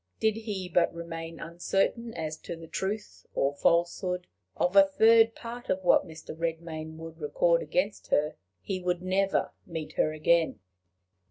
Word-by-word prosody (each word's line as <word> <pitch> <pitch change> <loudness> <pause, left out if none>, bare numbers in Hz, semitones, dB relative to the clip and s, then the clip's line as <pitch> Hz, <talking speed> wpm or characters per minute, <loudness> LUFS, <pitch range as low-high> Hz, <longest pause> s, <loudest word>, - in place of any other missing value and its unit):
Did 220 -1 +2
he 210 -5 -4
but 175 -1 +3
remain 165 -1 -6
uncertain 195 +7 -1
as 160 -2 -3
to 170 - -7
the 165 0 -10
truth 200 +5 -4
or 140 +1 +2
falsehood 175 +4 +1 0.3
of 180 +2 +1
a 195 - +11
third 225 +3 +5
part 240 +1 -8
of 190 0 0
what 185 - +4
Mr. 160 -1 -9
Redmain 160 -1 -4
would 165 0 -9
record 165 +3 +2
against 185 +6 -1
her, 150 +1 +2 0.3
he 185 -2 -3
would 180 0 -1
never 195 +1 +1 0.2
meet 155 -2 -5
her 155 - +3
again! 155 -5 +2
170 Hz, 155 wpm, -29 LUFS, 160-195 Hz, 0.3 s, a